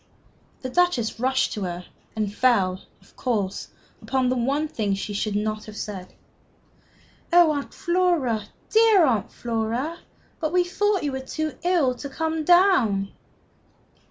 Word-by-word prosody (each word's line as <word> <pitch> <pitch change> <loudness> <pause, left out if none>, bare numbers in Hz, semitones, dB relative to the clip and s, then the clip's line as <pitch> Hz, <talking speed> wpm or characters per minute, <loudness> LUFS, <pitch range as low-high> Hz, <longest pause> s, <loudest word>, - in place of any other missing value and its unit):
The 255 - -4
Duchess 275 -11 +1
rushed 260 +2 +1
to 210 - -5
her, 180 -1 -4 0.3
and 210 -2 -2
fell, 195 -7 +2 0.2
of - - -24
course, 205 -6 -2 0.3
upon 260 -1 0
the 255 - +1
one 275 +5 0
thing 210 -8 -1
she 200 +1 -5
should 205 0 -2
not 215 +1 -2
have 215 -1 -10
said. 190 -3 -7 1.2
"Oh, 345 -2 +6
Aunt 285 -2 -3
Flora, 345 -11 0 0.3
dear 440 -5 +6
Aunt 230 -8 0
Flora! 235 +7 -3 0.4
But 315 0 -2
we 360 0 +4
thought 405 +2 0
you 290 - -1
were 265 - -3
too 310 +4 -4
ill 340 -8 +2
to 280 +3 -8
come 320 +2 -2
down!" 300 - +4
255 Hz, 145 wpm, -24 LUFS, 215-330 Hz, 1.2 s, Oh